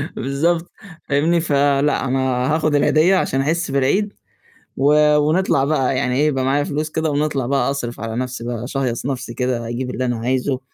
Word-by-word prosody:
بالضبط، 165 Hz, +6 st, -1 dB, 0.4 s
فاهمني؟ 160 Hz, +5 st, +2 dB
فلأ، 145 Hz, -2 st, +1 dB
أنا 130 Hz, +1 st, 0 dB, 0.3 s
هآخُد 155 Hz, -2 st, +1 dB
العيديّة 155 Hz, +6 st, +4 dB
عشان 135 Hz, -7 st, 0 dB
أحس 160 Hz, +1 st, -1 dB
بالعيد 145 Hz, +10 st, +1 dB, 0.6 s
و 150 Hz, +2 st, +4 dB
ونطلع 150 Hz, -1 st, +2 dB
بقى 135 Hz, -3 st, 0 dB
يعني 125 Hz, 0 st, 0 dB
إيه، 150 Hz, -, +3 dB
يبقى 135 Hz, -3 st, 0 dB
معايا 140 Hz, +2 st, +1 dB
فلوس 150 Hz, +1 st, -3 dB
كده 160 Hz, 0 st, -1 dB
ونطلع 145 Hz, -3 st, -1 dB
بقى 140 Hz, +1 st, +1 dB
أصرف 120 Hz, -5 st, -4 dB
على 115 Hz, 0 st, -4 dB
نَفْسي 125 Hz, -1 st, -4 dB
بقى، 120 Hz, -1 st, -4 dB
أشهيص 130 Hz, -2 st, -3 dB
نَفْسي 125 Hz, -3 st, -4 dB
كده، 125 Hz, -2 st, -2 dB
أجيب 125 Hz, +2 st, -4 dB
اللي 130 Hz, -, -3 dB
أنا 120 Hz, -2 st, -1 dB
عايزه 130 Hz, +2 st, -1 dB
140 Hz, 175 wpm, -20 LUFS, 130-150 Hz, 0.6 s, العيديّة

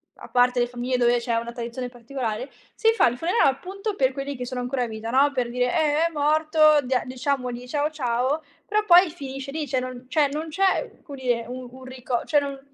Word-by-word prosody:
a -, -, -12 dB
parte 245 Hz, 0 st, +3 dB
le 240 Hz, -, +2 dB
famiglie 245 Hz, +1 st, -2 dB
dove 240 Hz, 0 st, +3 dB
c'è 235 Hz, 0 st, -2 dB
una 235 Hz, +1 st, -3 dB
tradizione 240 Hz, +1 st, -5 dB
particolare, 245 Hz, 0 st, -5 dB, 0.2 s
si 450 Hz, -, +3 dB
fa 450 Hz, -, +4 dB
il 240 Hz, +1 st, -1 dB
funerale 330 Hz, -, +3 dB
appunto 390 Hz, +9 st, -4 dB
per 260 Hz, -4 st, +2 dB
quelli 275 Hz, +1 st, -4 dB
che 250 Hz, -1 st, -5 dB
sono 250 Hz, 0 st, -4 dB
ancora 250 Hz, +1 st, -1 dB
in 240 Hz, -, -3 dB
vita, 220 Hz, +1 st, -6 dB
no, 275 Hz, +4 st, +4 dB
per 250 Hz, -3 st, -1 dB
dire: 250 Hz, +1 st, 0 dB
"Eh, 310 Hz, 0 st, +2 dB
è 335 Hz, -, -7 dB
morto, 310 Hz, 0 st, +4 dB
dia 250 Hz, -1 st, +1 dB
diciamogli 250 Hz, -1 st, -3 dB
ciao, 290 Hz, +3 st, 0 dB
ciao." 265 Hz, +1 st, -1 dB, 0.2 s
Però 425 Hz, 0 st, +1 dB
poi 360 Hz, -1 st, +7 dB
finisce 275 Hz, -4 st, -7 dB
lì, 305 Hz, 0 st, -3 dB
cioè, 260 Hz, 0 st, 0 dB
non 255 Hz, 0 st, -7 dB
cioè 285 Hz, +2 st, +2 dB
non 310 Hz, +2 st, -4 dB
c'è, 380 Hz, +4 st, 0 dB
come 285 Hz, -4 st, -9 dB
dire, 245 Hz, -3 st, -1 dB
un 250 Hz, +1 st, -7 dB
un 260 Hz, +1 st, -13 dB
rico 255 Hz, -2 st, -3 dB
cioè, 295 Hz, -, +3 dB
non 280 Hz, -1 st, -5 dB
260 Hz, 220 wpm, -24 LUFS, 245-300 Hz, 0.2 s, poi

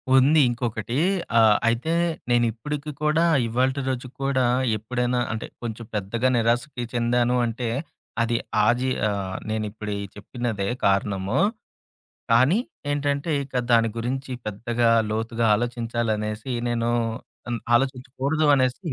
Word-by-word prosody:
ఉంది 140 Hz, +4 st, +6 dB
ఇంకొకటి. 120 Hz, -1 st, -3 dB, 0.4 s
ఆహ్, 110 Hz, -2 st, +6 dB
అయితే 120 Hz, +8 st, +1 dB, 0.4 s
నేనిప్పుడికి 120 Hz, +6 st, 0 dB
కూడా 155 Hz, +2 st, +3 dB, 0.2 s
ఇవాల్టి 130 Hz, +4 st, +1 dB
రోజుకి 125 Hz, 0 st, -4 dB
కూడా 135 Hz, -2 st, +2 dB, 0.3 s
ఎప్పుడైనా 125 Hz, +3 st, -1 dB
అంటే 110 Hz, 0 st, -4 dB, 0.2 s
కొంచెం 115 Hz, 0 st, -5 dB
పెద్దగా 105 Hz, +5 st, 0 dB
నిరాశకి 120 Hz, +3 st, 0 dB
చెందాను 120 Hz, +1 st, +2 dB
అంటే 120 Hz, +1 st, -3 dB, 0.5 s
అది 115 Hz, 0 st, +1 dB, 0.3 s
ఆ -, -, +4 dB
జీ 130 Hz, +1 st, 0 dB, 0.2 s
ఆహ్, 95 Hz, -2 st, -3 dB
నేనిప్పుడు 110 Hz, -1 st, -3 dB
ఈ -, -, -4 dB
చెప్పినదే 105 Hz, -1 st, -3 dB, 0.2 s
కారణము. 100 Hz, -1 st, +1 dB, 0.9 s
కానీ 130 Hz, -, +5 dB, 0.3 s
ఏంటంటే, 145 Hz, +2 st, -1 dB
ఇక 135 Hz, -, -17 dB, 0.2 s
దాని 115 Hz, -1 st, +5 dB
గురించి 130 Hz, +3 st, -3 dB
పెద్దగా, 115 Hz, +3 st, 0 dB, 0.2 s
లోతుగా 115 Hz, +1 st, -1 dB
ఆలోచించాలనేసి 115 Hz, 0 st, -2 dB, 0.2 s
నేను 120 Hz, 0 st, 0 dB, 0.6 s
అన్ 120 Hz, -1 st, -1 dB, 0.2 s
ఆలోచించకూడదు 135 Hz, +4 st, 0 dB
అనేసి 135 Hz, +5 st, 0 dB
120 Hz, 115 wpm, -24 LUFS, 110-130 Hz, 0.9 s, ఉంది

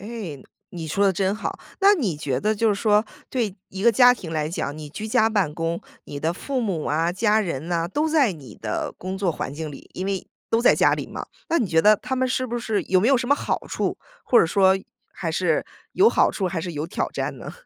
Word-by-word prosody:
哎， 200 Hz, -, -7 dB, 0.3 s
你 170 Hz, -3 st, -6 dB
说 200 Hz, +6 st, +2 dB
得 190 Hz, -, +3 dB
真 190 Hz, +2 st, 0 dB
好。 215 Hz, -, -4 dB, 0.2 s
那 400 Hz, +1 st, +7 dB
你 220 Hz, -, -1 dB
觉 135 Hz, -4 st, -2 dB
得 215 Hz, +5 st, +1 dB
就 225 Hz, +2 st, +2 dB
是 205 Hz, -, +3 dB
说 210 Hz, +1 st, +3 dB, 0.3 s
对 220 Hz, -6 st, -1 dB
一 190 Hz, 0 st, -6 dB
个 235 Hz, -, +6 dB
家 245 Hz, +2 st, +7 dB
庭 175 Hz, -9 st, -8 dB
来 155 Hz, -1 st, -1 dB
讲， 150 Hz, -3 st, -3 dB
你 155 Hz, -1 st, -8 dB
居 215 Hz, +9 st, -6 dB
家 220 Hz, 0 st, +3 dB
办 200 Hz, -9 st, 0 dB
公， 165 Hz, 0 st, -2 dB, 0.2 s
你 145 Hz, -, -7 dB
的 160 Hz, +3 st, 0 dB
父 260 Hz, +8 st, -3 dB
母 190 Hz, -9 st, -2 dB
啊、 165 Hz, +3 st, +1 dB
家 215 Hz, +2 st, +2 dB
人 165 Hz, -5 st, -3 dB
呐， 170 Hz, -1 st, 0 dB
都 300 Hz, -, 0 dB
在 295 Hz, -9 st, +3 dB
你 135 Hz, -10 st, -12 dB
的 105 Hz, -1 st, -3 dB
工 185 Hz, +1 st, -4 dB
作 190 Hz, -3 st, +1 dB
环 135 Hz, -, -4 dB
境 155 Hz, +1 st, -5 dB
里， 140 Hz, -, -12 dB
因 185 Hz, +2 st, -3 dB
为 195 Hz, -2 st, -2 dB, 0.2 s
都 225 Hz, -, +3 dB
在 -, -, +6 dB
家 -, -, +4 dB
里 -, -, -5 dB
嘛。 -, -, -7 dB, 0.2 s
那 335 Hz, -, +2 dB
你 235 Hz, -, +1 dB
觉 160 Hz, -2 st, +3 dB
得 210 Hz, 0 st, +6 dB
他 260 Hz, -, -4 dB
们 260 Hz, 0 st, +1 dB
是 255 Hz, 0 st, 0 dB
不 240 Hz, 0 st, -3 dB
是 220 Hz, -3 st, -1 dB
有 185 Hz, -1 st, +3 dB
没 220 Hz, -, +3 dB
有 275 Hz, -, +5 dB
什 245 Hz, 0 st, -2 dB
么 285 Hz, -, +6 dB
好 -, -, -3 dB
处？ -, -, -2 dB, 0.3 s
或 245 Hz, -, +5 dB
者 -, -, +3 dB
说， 190 Hz, +2 st, +4 dB, 0.4 s
还 -, -, -3 dB
是 -, -, +1 dB, 0.3 s
有 405 Hz, +4 st, +5 dB
好 -, -, +3 dB
处 195 Hz, -, -2 dB
还 175 Hz, -2 st, -3 dB
是 175 Hz, +1 st, -5 dB
有 150 Hz, +1 st, -3 dB
挑 -, -, -2 dB
战 -, -, -3 dB
呢？ -, -, -8 dB
195 Hz, 270 characters per minute, -23 LUFS, 165-225 Hz, 0.4 s, 那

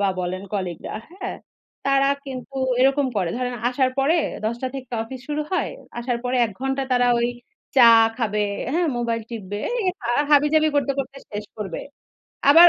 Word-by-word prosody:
বা 200 Hz, -, +3 dB
বলেন 185 Hz, +2 st, -3 dB
কলিগরা, 185 Hz, -4 st, -3 dB, 0.2 s
হ্যাঁ, 380 Hz, 0 st, -5 dB, 0.5 s
তারা 275 Hz, 0 st, +4 dB, 0.2 s
কিন্তু 270 Hz, 0 st, -7 dB, 0.3 s
এরকম 270 Hz, +1 st, +4 dB
করে। 180 Hz, -4 st, +1 dB
ধরেন, 250 Hz, 0 st, -2 dB
আসার 255 Hz, +1 st, +2 dB
পরে 285 Hz, +5 st, +4 dB, 0.3 s
১০ 230 Hz, +2 st, 0 dB
টা -, -, +1 dB
থেকে 260 Hz, -2 st, -7 dB
অফিস 250 Hz, +3 st, -8 dB
শুরু 300 Hz, +1 st, -1 dB
হয়। -, -, +1 dB, 0.3 s
আসার 240 Hz, 0 st, -1 dB
পরে 250 Hz, +1 st, 0 dB
১ 215 Hz, -, -9 dB
ঘন্টা 270 Hz, +1 st, 0 dB
তারা 245 Hz, 0 st, +4 dB, 0.7 s
চা 255 Hz, -, +9 dB, 0.3 s
খাবে, 210 Hz, -3 st, 0 dB, 0.3 s
হ্যাঁ, 340 Hz, +1 st, +2 dB
মোবাইল 230 Hz, -1 st, -1 dB
টিপবে। 205 Hz, -3 st, -5 dB, 0.2 s
এই 400 Hz, -, -1 dB, 0.4 s
হাবিজাবি 300 Hz, +2 st, +5 dB
করতে, 280 Hz, -1 st, +2 dB
করতে 275 Hz, 0 st, -3 dB
শেষ 210 Hz, 0 st, -4 dB
করবে। 195 Hz, -5 st, -4 dB, 0.7 s
আবার 335 Hz, +4 st, +10 dB
255 Hz, 160 wpm, -23 LUFS, 225-275 Hz, 0.7 s, আবার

